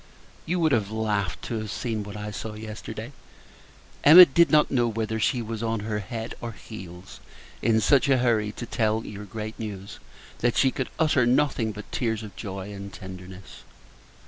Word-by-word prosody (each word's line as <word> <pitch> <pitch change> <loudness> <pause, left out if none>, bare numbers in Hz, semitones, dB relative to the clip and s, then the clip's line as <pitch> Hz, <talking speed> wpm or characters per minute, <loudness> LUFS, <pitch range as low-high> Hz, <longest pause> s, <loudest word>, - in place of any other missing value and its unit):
You 180 +2 0
would 160 -2 +3
have 105 -6 +1
laughed 105 -5 -2
to 115 - -3
have 110 -1 -5
seen 115 -3 -3
what 100 0 -7
I 105 0 -5
saw 105 +2 -6
yesterday! 110 +2 -7 0.9
Emma 175 +5 +11
did 170 +3 +4
not 150 -1 +4
know 120 -3 +2
whether 110 0 -2
she 120 +2 +1
was 115 0 -5
on 115 -2 -1
her 105 0 -2
head 110 +3 -5
or 115 -1 -5
heels 95 -3 -11 0.4
in 110 0 +3
such 140 +5 +3
a 135 - +5
hurry 115 -4 +1
to 120 - -6
tell 110 -1 0
your 105 0 -8
great 110 +2 -7
news, 100 -3 -7 0.4
that 120 0 +1
she 130 - +4
could 130 - -3
utter 150 -6 +3
nothing 125 -3 +2
but 105 0 -10
tears 115 -3 -1
of 105 - -10
joy 100 -1 -6
and 100 0 -8
tenderness. 95 0 -10
110 Hz, 180 wpm, -26 LUFS, 105-120 Hz, 0.9 s, Emma